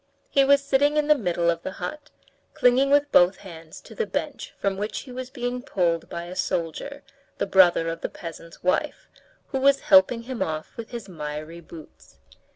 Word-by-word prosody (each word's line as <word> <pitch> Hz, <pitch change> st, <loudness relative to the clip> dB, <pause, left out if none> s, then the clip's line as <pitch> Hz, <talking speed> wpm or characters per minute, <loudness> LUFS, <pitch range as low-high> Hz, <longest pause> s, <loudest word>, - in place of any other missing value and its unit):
He 275 Hz, -, +5 dB
was 280 Hz, 0 st, +4 dB
sitting 285 Hz, +2 st, +2 dB
in 300 Hz, -, +2 dB
the 300 Hz, -, +6 dB
middle 175 Hz, -8 st, +1 dB
of 170 Hz, 0 st, -4 dB
the 190 Hz, -, -6 dB
hut, 300 Hz, +6 st, -7 dB, 0.5 s
clinging 255 Hz, +3 st, +4 dB
with 285 Hz, +1 st, +3 dB
both 180 Hz, +2 st, +5 dB
hands 165 Hz, -3 st, -11 dB
to -, -, -13 dB
the 455 Hz, -, -2 dB
bench -, -, -4 dB
from 195 Hz, -1 st, -1 dB
which 210 Hz, +2 st, -4 dB
he 260 Hz, -, -12 dB
was 255 Hz, 0 st, -6 dB
being 250 Hz, -1 st, -4 dB
pulled 170 Hz, -8 st, -1 dB
by 170 Hz, -, -5 dB
a 175 Hz, +1 st, -8 dB
soldier, 185 Hz, -, -3 dB, 0.3 s
the -, -, 0 dB
brother 180 Hz, -4 st, +4 dB
of 165 Hz, 0 st, -4 dB
the -, -, -3 dB
peasant's 165 Hz, 0 st, -10 dB
wife, 185 Hz, -, -1 dB, 0.4 s
who 270 Hz, -, -2 dB
was 275 Hz, +1 st, +4 dB
helping 195 Hz, +5 st, +5 dB
him 250 Hz, 0 st, -6 dB
off 155 Hz, -1 st, -3 dB
with 230 Hz, -1 st, -8 dB
his 235 Hz, -4 st, -7 dB
miry 155 Hz, -1 st, -7 dB
boots. 160 Hz, -2 st, -14 dB
195 Hz, 190 wpm, -25 LUFS, 170-270 Hz, 0.5 s, the